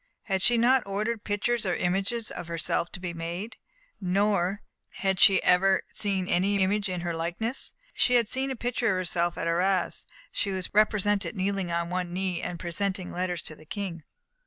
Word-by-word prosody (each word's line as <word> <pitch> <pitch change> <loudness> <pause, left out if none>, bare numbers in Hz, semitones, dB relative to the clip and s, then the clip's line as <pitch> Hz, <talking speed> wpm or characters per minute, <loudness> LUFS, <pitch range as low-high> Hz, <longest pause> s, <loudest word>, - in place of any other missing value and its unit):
Had 190 -4 0
she 240 +4 +5
not 245 +2 +4
ordered 210 +3 -2
pictures 215 +3 0
or 185 -3 0
images 195 +5 -1
of - - -6
herself 170 0 -1
to - - -5
be 180 -1 -4
made? 170 +6 -5 0.4
No, 195 +1 +1
nor 195 +1 0 0.3
had 190 -2 -1
she 195 -1 +7
ever 190 +1 +4
seen 195 -4 0
any 195 +2 +2
image 200 +1 +1
in 180 -1 -3
her 170 0 -2
likeness. 175 +10 -3 0.2
She 250 - +3
had 235 -3 +4
seen 265 +4 -1
a 265 - -2
picture 240 0 -1
of 190 - +2
herself 175 -1 -1
at - - -2
Arras. 180 +2 0 0.2
She 200 - -1
was 190 -2 -3
represented 205 -2 +2
kneeling 195 -2 -1
on 170 0 -1
one 180 -1 -2
knee, 185 -2 -1
and 175 -1 -4
presenting 185 +1 -2
letters 180 -1 -2
to 155 - -7
the 155 - -16
King. 190 -4 -4
190 Hz, 185 wpm, -27 LUFS, 175-210 Hz, 0.4 s, she